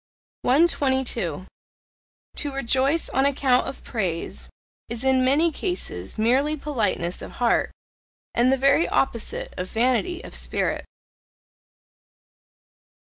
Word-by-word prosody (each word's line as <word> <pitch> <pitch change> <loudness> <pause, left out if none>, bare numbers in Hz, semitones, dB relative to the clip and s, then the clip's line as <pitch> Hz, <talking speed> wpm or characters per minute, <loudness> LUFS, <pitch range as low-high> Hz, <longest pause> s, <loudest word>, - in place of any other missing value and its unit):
122. 260 - +1 0.9
To 290 - -1
rejoice 270 +4 +1
on 265 - +1
account 265 -2 +2
of 270 - -7
praise 185 -8 -3 0.4
is 235 +1 -3
in 265 -1 +3
many 295 +6 +3
cases 310 - -3
merely 265 +8 +2
politeness 225 - -1
of - - -8
heart 240 -1 +1 0.6
and 245 +2 +3
the 270 - +3
very 275 +5 +3
opposite 230 -4 -1
of 180 0 -3
vanity 255 +10 0
of - - -10
spirit. - - -1
260 Hz, 105 wpm, -24 LUFS, 230-280 Hz, 0.9 s, in